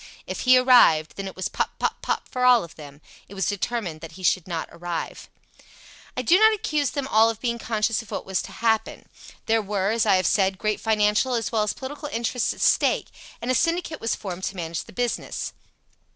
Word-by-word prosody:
If - - -5
he 255 0 +6
arrived, 245 -12 +5
then 195 -1 -5
it 190 - -8
was 190 - -2
pop, - - -3
pop, - - -2
pop - - -2
for 250 - -3
all 250 -2 +6
of 170 - -11
them. 145 -1 -12 0.3
It 200 - -11
was 190 -2 -1
determined 200 -5 -3
that 165 0 -9
he 185 +2 -12
should 180 -1 +2
not 170 -3 -3
arrive. 175 0 -6 0.9
"I - - -1
do 360 +3 +5
not 440 0 +6
accuse 300 -8 -1
them 280 -2 -3
all 225 -3 +4
of 225 -2 -4
being 235 -1 -2
conscious 220 0 0
of 225 - -16
what - - -5
was 190 -1 -1
to - - -9
happen. 225 -1 -1 0.4
There 225 0 +2
were, 200 -1 -1
as 225 -1 +1
I 200 - +5
have 185 -1 +1
said, 195 -2 +2
great 215 +1 -1
financial 215 +3 +2
as 230 -2 -2
well 225 -2 +1
as 210 - 0
political 290 +3 -7
interests 235 +1 -1
at - - -8
stake, - - +2 0.3
and 250 - 0
a - - +2
syndicate 330 +1 0
was 225 - 0
formed 185 -2 -7
to 195 - -4
manage 165 -2 -4
the - - -14
business. 245 +2 -3
220 Hz, 220 wpm, -24 LUFS, 190-245 Hz, 0.9 s, he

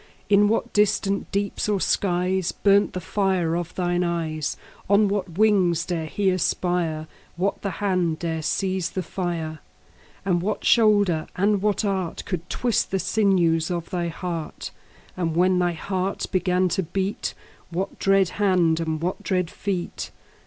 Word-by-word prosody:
In 205 0 +5
what 225 +2 0
distant 200 -1 +1
deeps 200 +1 -1
or 205 -2 +2
skies 185 -1 +1
5 - - -25
Burnt 200 0 +4
the 185 - -3
fire 185 -3 0
of 175 -1 -4
thine 175 -1 0
eyes? 160 -3 -2 0.3
On 205 +1 +5
what 195 -4 -3
wings 190 -6 +3
dare 165 -3 -2
he 195 +4 +1
aspire? 175 -3 0 0.3
What 190 +3 -1
the 200 - -2
hand 180 -4 0
dare 165 -1 -2
seize 185 +2 -1
the 185 - -3
fire? 165 -3 -3 0.7
And 175 -3 +2
what 205 +4 -2
shoulder 205 -8 +4
and 200 +1 +2
what 210 +1 +1
art 190 -4 -2
Could 180 -2 -4
twist 240 -2 0
the 195 - 0
sinews 180 -6 +2
of 170 0 -3
thy 175 -2 -1
heart? 170 -1 -5 0.5
10 - - -4
And 160 - -3
when 180 +1 +3
thy 175 -1 +1
heart 185 +3 -2
began 185 0 +2
to 190 - 0
beat, 190 +3 -3 0.3
What 185 +3 -4
dread 195 -2 +3
hand 175 -5 +3
and 160 -1 -2
what 175 +3 -2
dread 180 -3 -1
feet? 190 -4 -3
185 Hz, 160 wpm, -24 LUFS, 170-195 Hz, 0.7 s, In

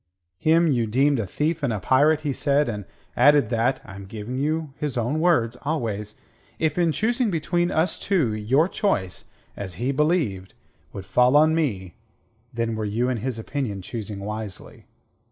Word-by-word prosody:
Him 165 +2 +4
you 125 -8 +1
deemed 135 +4 +2
a 105 - -2
thief 155 - -1
and 140 -4 0
a 110 - -2
pirate, 145 - +3
he 145 -3 -1
said, 145 +2 +1
and 105 -4 -4 0.3
added 145 -1 +5
that 120 +2 +1
I - - -10
am 95 0 -9
giving 110 +4 -6
you 155 0 -1
his 145 -4 -2
own 120 +7 0
words 125 -9 +2
always 110 -8 -3 0.4
if 155 -2 0
in 170 -2 +3
choosing 235 - 0
between 175 0 0
us 170 0 0
two, 160 - +1
your 125 +10 +2
choice, 140 - -1 0.3
as 95 -4 -6
he 120 +8 -1
believed, 140 - 0 0.4
would 95 -2 -8
fall 125 +5 +3
on 155 +1 +5
me, 105 - -2 0.5
then 115 -1 -2
were 110 0 -3
you 115 +4 0
in 125 - -1
his 120 +2 -3
opinion 115 -5 -4
choosing 105 -2 -6
wisely. 105 -1 -7
130 Hz, 170 wpm, -24 LUFS, 110-155 Hz, 0.5 s, added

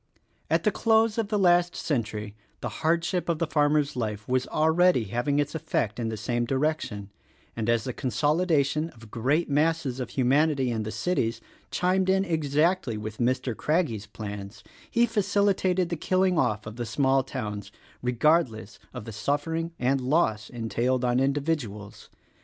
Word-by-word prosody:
At - - +2
the - - +3
close 225 0 +2
of 220 - 0
the 210 0 0
last 175 -2 +3
century 110 -7 -2 0.3
the 120 - -3
hardship 170 +2 +1
of 170 - +1
the 170 - 0
farmer's 150 -1 +1
life 105 -4 -3
was 130 0 0
already 160 -2 +3
having 120 +7 -1
its 145 0 0
effect 140 -9 -2
in 115 -1 -1
this 110 -1 -5
same 120 -1 -1
direc 150 +5 +1
tion, 100 -3 -7 0.4
and 115 0 -2
as 115 -1 +2
the 130 - -4
consolidation 150 - +1
of 110 -2 -15
great 140 +9 +1
masses 150 -3 +1
of 125 -3 -4
humanity 135 +1 +2
in 110 -2 -1
the 110 0 -4
cities 115 -10 -1 0.3
chimed 185 +1 +1
in 190 +1 +3
exactly 160 - +1
with 105 0 -6
Mr. 125 0 0
Craggie's 140 - 0
plans 100 -1 -8 0.3
he 235 +1 +3
facilitated 200 -4 +1
the 170 - -1
killing 185 +3 +1
off 110 -8 0
of 110 +2 -8
the 120 - -3
small 135 +3 +2
towns 105 -6 -5 0.2
— - - -28
regardless 125 -3 +1 0.2
of - - -6
the 115 - -7
suffering 155 +9 -1
and 130 +2 +1
loss 125 -6 +1
entailed 120 +2 -1
on 125 0 +2
individuals. 135 -7 -2
135 Hz, 165 wpm, -27 LUFS, 115-165 Hz, 0.4 s, the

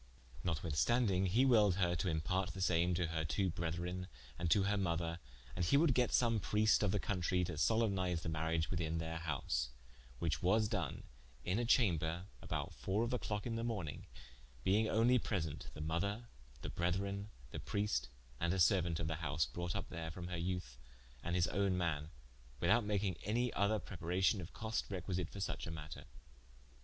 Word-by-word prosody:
Notwithstanding, 90 +5 +2
he 115 +9 +4
willed 105 -7 +5
her 90 -2 +2
to 90 - 0
imparte 90 +3 -1
the - - -6
same 85 0 +3
to 90 0 +1
her 80 -1 -1
twoo 90 +3 0
brethren, 85 +2 -3 0.3
and 85 -1 0
to 100 +3 +5
her 100 +1 +2
mother, 85 -3 -1 0.4
and - - 0
he 85 +11 +4
would 150 -2 +5
get 125 0 +2
some 115 -3 +3
Priest 105 +2 +3
of 105 - +3
the 105 - +1
countrie 90 -2 0
to - - -4
solempnize 95 -1 +1
the - - -4
mariage 80 0 0
within 85 -3 -1
their 80 0 -3
house: 65 -6 -1 0.5
which 75 -1 -1
was 105 +4 +3
doen 95 -10 -2 0.4
in 95 +5 +1
a 120 - 0
chamber, 85 -7 +2 0.2
about - - -3
fower 100 +4 -1
of 120 - -1
the 125 - 0
clocke 105 -1 -3
in 115 -2 -2
the 115 - -2
morning, 100 -11 -3 0.6
being 110 +3 +3
onely 120 +3 +4
present 80 -10 -3
the 75 - -6
mother, 100 +9 -2 0.3
the - - -3
brethren, 100 +4 -1 0.2
the - - -5
Prieste, 105 -7 -1 0.3
and 85 +1 +1
a - - -1
seruaunt 90 -2 +3
of 80 - -1
the 80 0 -2
house, 80 -1 0
brought 85 -1 -4
vp - - -2
there 80 0 -4
from 90 +2 -6
her 90 - -3
youthe, 85 -7 -3 0.4
and 85 - -2
his 90 -2 +4
own 100 -1 +1
man, 80 -4 -1 0.5
without 120 - +4
making 100 -4 0
any 120 +3 0
other 100 +3 +2
preparation 95 +1 0
of 85 - -8
coste, 110 0 -2
requisite 90 -3 -2
for - - -10
suche 95 - -3
a - - -4
matter. 75 -2 -8
90 Hz, 185 wpm, -37 LUFS, 80-105 Hz, 0.6 s, willed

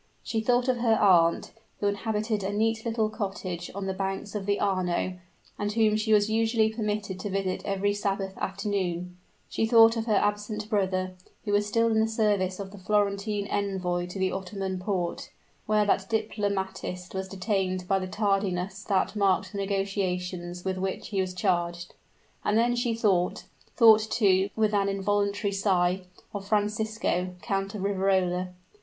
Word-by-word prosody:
She 225 - -1
thought 245 +2 +2
of 255 -1 +2
her 230 -2 +3
aunt, 170 -4 +4 0.3
who - - -2
inhabited 210 +1 -1
a 195 - -1
neat 220 +2 0
little 225 -1 +1
cottage 195 -5 -4
on 200 -1 -3
the 190 - -1
banks 195 +1 -3
of 205 -2 -4
the 200 0 +1
Arno, 185 -2 0 0.4
and 205 0 -1
whom 215 -1 +3
she 215 +1 0
was 210 -1 +5
usually 220 0 +2
permitted 210 -3 -3
to 205 - -4
visit 190 -1 -2
every 200 +1 0
Sabbath 195 -1 -2
afternoon 190 -3 -2 0.3
she 225 - 0
thought 225 0 +7
of 225 0 -3
her 215 - +3
absent 210 +1 -1
brother, 185 -2 0 0.3
who 205 - -1
was 205 0 +2
still 230 +2 +2
in 220 - +3
the 220 - +3
service 205 -4 +1
of 195 -1 -6
the 200 - -11
Florentine 205 +1 0
Envoy 185 -4 -1
to 180 - -7
the 190 -1 +1
Ottomon 190 0 -4
Porte, 180 -2 -2 0.4
where 210 -1 +3
that 195 -1 +1
diplomatist 195 -4 -2
was 190 0 -3
detained 185 -1 -1
by 195 0 +2
the 185 - -4
tardiness 195 -1 -1
that 195 +1 +1
marked 195 -1 +2
the 200 - -5
negotiations 185 -3 -2
with 190 -1 -1
which 190 0 -3
he 200 -2 0
was 185 -1 -3
charged; 175 -2 -1 0.5
and 210 - +2
then 240 +1 +3
she 240 -1 0
thought 195 -6 +1 0.3
thought 220 -3 +8
too, 195 -4 +3
with 215 -1 +2
an 200 -1 +2
involuntary 200 +1 0
sigh 190 -2 +2 0.3
of 200 -1 -5
Francisco, 210 -3 0
Count 195 +1 -2
of 195 - -4
Riverola. 190 -2 +1
200 Hz, 165 wpm, -27 LUFS, 185-215 Hz, 0.5 s, thought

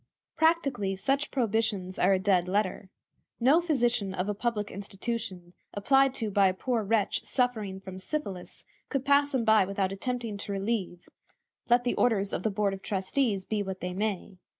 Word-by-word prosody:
Practically 275 - +1
such 275 +9 0
prohibitions 220 -6 -1
are 185 - +4
a - - +3
dead 185 -2 +2
letter. 195 0 -1 0.5
No 275 +8 +5
physician 240 - 0
of 180 +1 -2
a 210 - 0
public 210 -1 -2
institution, 195 -3 -5 0.2
applied 270 +5 +3
to 220 -5 -3
by 200 -1 +4
a 185 - 0
poor 240 +3 -1
wretch 210 0 0
suffering 220 -7 -1
from 190 -1 -9
syphilis, 195 -6 -5 0.2
could 275 -2 -2
pass 285 0 +4
him 235 -3 +1
by 220 -2 +6
without 195 0 -1
attempting 230 +1 -3
to 200 - -6
relieve, 195 -3 -3 0.6
let 240 +1 +5
the 245 - 0
orders 200 -5 +1
of - - -1
the 220 - 0
board 200 -1 0
of 195 - -7
trustees 195 +1 -1
be 215 -1 -1
what 190 -2 -4
they 180 0 -4
may. 195 -2 -3
205 Hz, 175 wpm, -28 LUFS, 190-245 Hz, 0.6 s, by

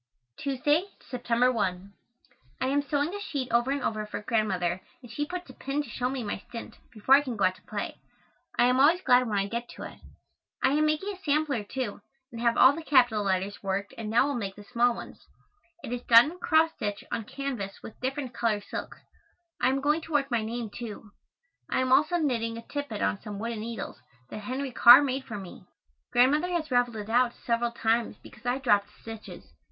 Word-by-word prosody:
Tuesday, 290 +5 +1 0.3
September 245 0 +2
1. 195 -4 -2 0.7
I - - 0
am 280 +2 +2
sewing 290 +4 -1
a 410 - -4
sheet 280 -10 -4
over 240 +2 +2
and 280 -1 -1
over 215 -1 -2
for - - -5
Grandmother 190 -6 0 0.2
and 240 - -11
she 295 +5 -3
puts 360 +1 -6
a - - -15
pin 275 +1 -6
in 295 - +1
to 270 - -12
show 250 +3 -1
me 260 -2 -3
my 205 -1 -3
stint, 230 +4 -10
before 225 +4 +2
I 280 - +8
can 255 -5 -5
go 200 - 0
out 185 - +3
to - - -22
play. - - -5 0.6
I 240 - +5
am 250 +1 +3
always 325 +6 +5
glad 250 -6 +4
when 205 - 0
I 195 - +1
get 235 +4 -4
to - - -8
it. - - -9 0.6
I - - +5
am 305 +2 +3
making 310 +7 -1
a - - -18
sampler, 290 -6 +1
too, 225 -1 -4 0.3
and 230 -1 -7
have 235 -1 +2
all 260 +2 +8
the 330 - -6
capital 245 -8 +3
letters 195 +1 -1
worked 195 +1 -2
and 220 -2 -5
now 230 +4 +4
will 285 - -1
make 200 -6 -4
the 205 - -11
small 240 +2 +2
ones. - - -11 0.6
It 240 - -5
is 245 - -3
done 240 +5 +7
in 360 - -12
cross 320 -1 +3
stitch 205 -3 -3
on 230 - -2
canvas 250 -7 -5
with 220 - -11
different 260 -1 -3
color 230 -3 0
silks. 205 - -7 0.6
I 255 - +4
am 270 +1 0
going 300 +3 +2
to 320 0 -9
work 280 -2 +1
my 235 -2 +2
name, 230 0 -4
too. 215 -2 -8 0.6
I - - +1
am 260 0 0
also 305 +6 +4
knitting 230 -7 -1
a 230 - -8
tippet 285 -8 -4
on 195 - 0
some 210 -2 -7
wooden 230 +1 -4
needles 230 +1 -6 0.3
that - - -5
Henry 260 +5 -4
Carr 245 +3 +9
made 265 -1 -2
for 215 - -6
me. 190 -3 -10 0.5
Grandmother 290 +8 +4
has 320 -4 -2
raveled 245 -2 +2
it 210 -1 -6
out 245 0 +3
several 235 0 +1
times 230 0 0
because 240 +3 -12
I 245 +1 +1
dropped 205 -7 +2 0.2
stitches. 225 -1 -10
245 Hz, 215 wpm, -28 LUFS, 215-280 Hz, 0.7 s, Carr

